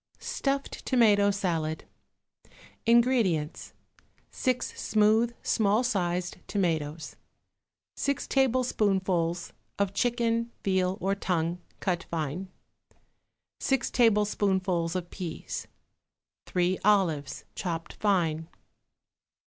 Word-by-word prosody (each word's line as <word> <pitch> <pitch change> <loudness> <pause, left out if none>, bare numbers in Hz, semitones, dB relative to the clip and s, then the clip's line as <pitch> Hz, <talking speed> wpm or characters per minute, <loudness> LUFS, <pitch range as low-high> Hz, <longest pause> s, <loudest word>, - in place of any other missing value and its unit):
=Stuffed 275 0 -2
Tomato 210 -5 +4
Salad.= 165 -6 -1 1.0
INGREDIENTS. 230 -10 +2 0.6
6 255 -1 -1
smooth, 220 +2 +3
small 215 +1 +2
sized 180 -6 -1
tomatoes. 160 -5 -1 0.8
6 280 0 -1
tablespoonfuls 195 -10 +1 0.2
of 200 -1 0
chicken, 235 +1 0
veal 190 -1 +1
or 195 +1 +1
tongue, 175 -3 -1 0.2
cut 180 -3 -1
fine. 165 +3 -3 1.1
6 270 -2 0
tablespoonfuls 195 -6 +2
of 175 -1 -4
peas. 175 -4 -5 0.8
3 180 +1 +1
olives, 180 -9 +2
chopped 165 -3 -4
fine. 165 -6 +1
195 Hz, 80 wpm, -28 LUFS, 170-225 Hz, 1.1 s, Tomato